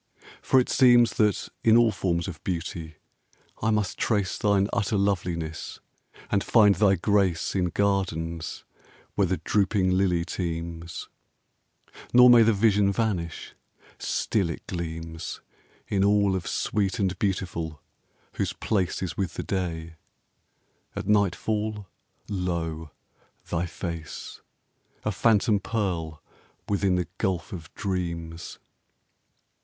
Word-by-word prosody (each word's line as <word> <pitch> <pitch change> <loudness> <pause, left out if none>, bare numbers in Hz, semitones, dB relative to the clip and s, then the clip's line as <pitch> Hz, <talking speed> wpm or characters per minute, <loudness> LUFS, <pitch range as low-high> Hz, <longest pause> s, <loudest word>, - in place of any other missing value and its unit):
For 130 - +4
it 125 - +1
seems 120 -2 +5
That 105 -2 +2
in 115 0 +6
all 120 -2 +5
forms 85 -4 -1
of 85 -5 -8
beauty 85 -3 -4 0.7
I 110 - +1
must 105 -3 0
trace 100 -5 +1
Thine 100 -1 +2
utter 105 0 +1
loveliness, 85 -5 -2 0.5
and 100 -1 +2
find 105 -3 +5
thy 100 -1 +4
grace 95 -2 +1
In 95 -2 +1
gardens 85 -4 -1 0.5
where 100 -2 +2
the 95 +1 0
drooping 100 -2 +1
lily 90 -2 +2
teems; 85 -1 -5 1.1
Nor 125 0 +9
may 120 -1 +8
the 115 0 +5
vision 100 -1 +3
vanish: 100 -7 -2 0.5
still 100 -6 0
it 85 - -6
gleams 80 -2 -5 0.5
In 100 -1 +1
all 100 -1 +3
of 90 -2 -4
sweet 100 -3 0
and 95 -2 0
beautiful 85 -6 -2 0.6
whose - - -1
place 95 -3 -1
Is 90 - -3
with 95 -5 -2
the - - -3
day; 85 -4 -3 1.0
at - - -4
nightfall, 105 +1 0 0.4
lo! 85 -5 -3 0.6
thy 85 +1 -1
face, 85 -3 -6 0.6
A 105 - +1
phantom 105 0 +3
pearl 85 -8 -3 0.4
within 100 -2 +1
the 90 -1 -1
gulf 95 -2 -1
of 80 -4 -8
dreams! 85 -4 -4
95 Hz, 120 wpm, -26 LUFS, 85-105 Hz, 1.1 s, Nor